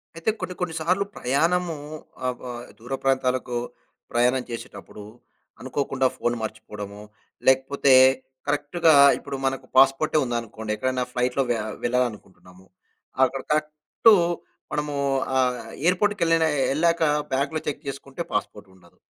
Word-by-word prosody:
అయితే 165 +6 -1
కొన్ని, 180 - -4
కొన్ని 180 -2 -2
సార్లు 185 +5 +1
ప్రయాణము 165 +6 +1 0.5
ఆహ్! 125 -1 0
వ 125 - -7 0.3
దూర 125 +4 -7
ప్రాంతాలకు 130 -2 0 0.6
ప్రయాణం 125 +2 +2
చేసేటప్పుడు 115 -2 -9 0.6
అనుకోకుండా 135 -2 0
ఫోన్ 120 0 0
మర్చిపోవడమో, 105 -2 -7 0.5
లేకపోతే 135 +1 +4 0.5
కరెక్ట్‌గా 150 +3 +2 0.2
ఇప్పుడు 140 -1 -6
మనకు 135 0 -1
పాస్‌పోర్టే 135 +4 +4
ఉందనుకోండి 115 -2 -4
ఎక్కడైనా 130 +2 -1
ఫ్లైట్‌లో 125 +2 0
వె 120 - +2 0.3
వెళ్ళాలనుకుంటున్నాము. 105 -7 -3 0.6
అక్కడ 135 +1 -4
కరెక్టు 155 +8 +3 0.6
మనము 150 -1 -2 0.4
ఆహ్! 125 -1 +2 0.3
ఎయిర్‌ 180 +1 +4
పోర్ట్‌‌కెళ్ళిన 165 -6 +2 0.3
ఎళ్ళాక 170 +2 +2 0.3
బ్యాగ్‌లో 140 +4 0
చెక్ 145 +1 -4
చేసుకుంటే 140 +2 -6
పాస్‌పోర్ట్ 105 -1 -3
ఉండదు. 85 -2 -23
135 Hz, 115 wpm, -24 LUFS, 120-155 Hz, 0.6 s, లేకపోతే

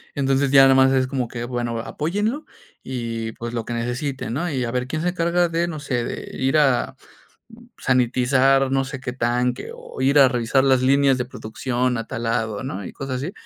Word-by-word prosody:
Entonces, 135 0 +1
ya 135 -1 +8
nada 135 0 +6
más 130 0 +5
es 130 -1 +2
como 130 -2 -2
que, 120 0 -5
bueno, 120 -2 -3
apóyenlo 205 - -2 0.4
y, 115 -3 -4
pues, 120 0 -6
lo 115 - -2
que 120 - -5
necesite, 125 +4 -3
¿no? 160 +9 -2
Y 130 -3 -1
a 115 - -3
ver 125 0 -1
quién 155 +3 -3
se 180 - +1
encarga 175 0 +1
de, 170 +1 0
no 155 -3 -5
sé, 125 -5 -2
de - - -6
ir 135 +3 +1
a, 135 -5 +2 0.6
mm, 240 - -17
sanitizar, 130 +2 +2
no 135 0 +2
sé 135 0 -6
qué 125 -1 -5
tanque, 125 0 -1
o - - -9
ir 140 +2 +3
a 135 - +8
revisar 125 +2 +1
las 130 -2 +3
líneas 135 0 +3
de 125 - -2
producción 125 +1 -2
a 115 - -5
tal 115 - -5
lado, 115 -2 -1
¿no? 100 -6 -5
Y - - -7
cosas 135 -2 -5
así, 150 +8 -4
130 Hz, 215 wpm, -22 LUFS, 120-140 Hz, 0.6 s, ya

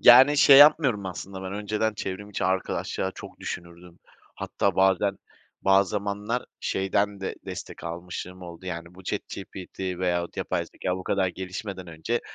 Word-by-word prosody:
Yani, 130 +4 +9
şey 140 -1 +9
yapmıyorum 140 -9 +6
aslında. 95 +1 -6
Ben 95 0 -5
önceden 105 +2 -1
çevrim 100 +1 -5
içi 100 - -2
arkadaşlığa 95 0 -1
çok - - -11
düşünürdüm. 85 0 -7 0.4
Hatta - - -1
bazen, 95 +1 +3 0.4
bazı 95 0 +4
zamanlar 105 +3 -2 0.2
şeyden 100 +1 0
de 95 - -3
destek - - -7
almışımlığım 90 +2 -6
oldu 85 +1 -9
yani, 85 -1 -5
bu 95 - -13
ChatGPT 95 0 -6
veyahut 90 -2 -1
yapay - - -1
zekâya 90 0 -3
bu 95 - -7
kadar 95 -2 +1
gelişmeden 95 +1 -6
önce; 85 +9 -2
95 Hz, 145 wpm, -26 LUFS, 90-105 Hz, 0.4 s, Yani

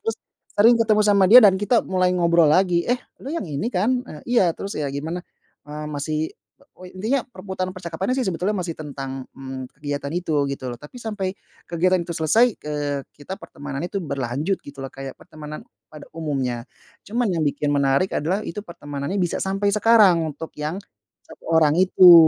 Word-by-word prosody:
terus 225 - 0 0.4
sering 230 +4 +7
ketemu 215 -1 +4
sama 200 -2 +5
dia 235 +7 +10
dan 190 -2 +6
kita 205 +4 +2
mulai 185 -1 +1
ngobrol 170 -3 +4
lagi, 180 -2 +3
"Eh, 245 +1 0 0.2
lu 280 - -4
yang 335 - -2
ini, 175 - -3
kan?" 245 +7 +1
"Eee, 150 - -10
iya." 240 -5 +4
"Terus, 200 +4 -6
ya, 150 - -1
gimana? 160 +5 -4 0.4
Eee, 150 +1 -6
masih" 150 +1 -2 0.6
o 185 - -13
i 180 - -11
intinya 225 +8 -1
perputaran 190 -5 -5
percakapannya, 185 +4 -3
sih, 265 - 0
sebetulnya 180 +4 0
masih 180 -5 -3
tentang 135 -3 -6
mmm, 130 -1 -7
kegiatan 145 0 -4
itu, 160 -5 0
gitu, 140 -2 -4
loh, 120 - -5
tapi 150 - -13
sampai 210 -5 -3 0.3
kegiatan 180 +2 +2
itu 170 - -5
selesai, 205 +10 +4
eee, 145 -3 -3 0.2
kita 190 +7 -8
pertemanannya 145 +3 -6
itu 200 - -6
berlanjut, 140 +6 -2
gitu, 140 -1 -9
loh, 135 - -7
kayak 135 -1 -8
pertemanan 155 0 -10 0.2
pada 150 -2 -11
umumnya. 135 -6 -3 0.4
Cuman 230 -1 0
yang 165 - -1
bikin 145 0 -1
menarik 140 +5 +2
adalah, 185 +8 -1
itu 205 +2 -5
pertemanannya 145 -2 -5
bisa 180 -3 0
sampai 195 +1 0
sekarang 210 -5 +5 0.2
untuk 160 - -7
yang 155 +4 -2 0.5
1 - - -16
orang 160 -2 +4
itu. 185 -1 +8
170 Hz, 180 wpm, -23 LUFS, 145-195 Hz, 0.6 s, dia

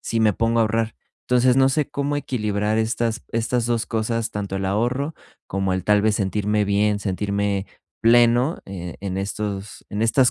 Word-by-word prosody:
si 115 - -2
me 110 -2 +4
pongo 115 +3 +1
a - - +6
ahorrar. 110 0 0 0.3
Entonces 125 +1 +4
no 135 0 +5
sé 145 +1 0
cómo 140 +1 -1
equilibrar 105 -6 -1
estas 115 0 -1
estas 115 +1 0
2 120 -1 0
cosas, 115 0 -1
tanto 100 -2 -3
el 95 - -2
ahorro 125 +10 0 0.3
como 95 0 -1
el 95 -1 -3
tal 105 -1 +4
vez 110 0 +2
sentirme 105 +1 0
bien, 105 +1 +2
sentirme 100 0 -1 0.4
pleno, 120 +5 +4
eh, 90 -3 -7
en 95 -1 -3
estos 100 0 -4
en 105 - -3
estas 125 +3 +4
110 Hz, 175 wpm, -22 LUFS, 100-120 Hz, 0.4 s, a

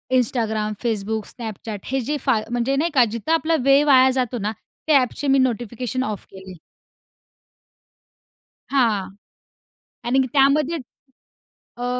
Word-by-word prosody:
Instagram, 220 -4 0
Facebook, 220 -2 -2
Snapchat, 220 -3 -7
हे 270 +1 -1
जे 295 +5 -2
फा 260 -5 +3
म्हणजे 245 +3 0
नाही 320 +4 0
का 250 -3 +6
जिथं 270 +8 -3
आपला 325 0 +2
वेळ 275 +2 +5
वाया 265 -2 +6
जातो 250 -1 -1
ना, 210 +1 -2 0.4
त्या 290 -3 +6
ॲपचे 255 +3 -2
मी 270 0 +4
नोटिफिकेशन 250 +1 -1
ऑफ 210 -4 -5
केले. 190 -1 -11 2.2
हां. 230 -8 +1 1.0
आणि 255 +3 +2
की 260 - -1
त्यामध्ये 290 +3 +3 1.0
अ 245 - -4
250 Hz, 130 wpm, -22 LUFS, 220-275 Hz, 2.2 s, का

